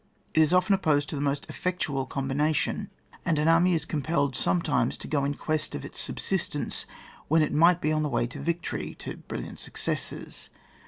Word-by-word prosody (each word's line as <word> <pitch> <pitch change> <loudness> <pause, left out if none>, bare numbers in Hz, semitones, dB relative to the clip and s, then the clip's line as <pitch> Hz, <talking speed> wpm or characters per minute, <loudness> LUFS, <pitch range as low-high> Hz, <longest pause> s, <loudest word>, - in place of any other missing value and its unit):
It 160 - +5
is 155 0 +4
often 180 +3 +4
opposed 150 -6 +2
to - - -3
the 140 - -2
most 140 0 -1
ofTectual 150 -7 -2
combination, 140 +3 0 0.3
and 160 - +1
an 150 +1 +2
army 170 +2 +5
is 160 - 0
compelled 145 -3 0
sometimes 150 -8 +1
to - - -6
go 145 -3 +1
in 145 +1 0
quest 155 +1 -1
of 70 - -5
its - - -7
subsistence, - - -2 0.4
when 160 +1 +4
it 150 - -1
might 170 +3 +5
be 155 - +1
on 155 0 +2
the 150 - 0
way 120 - +1
to 120 - -7
victory, 170 0 -2
to - - -7
brilliant - - -7
successes. - - -3
155 Hz, 190 wpm, -28 LUFS, 140-165 Hz, 0.4 s, It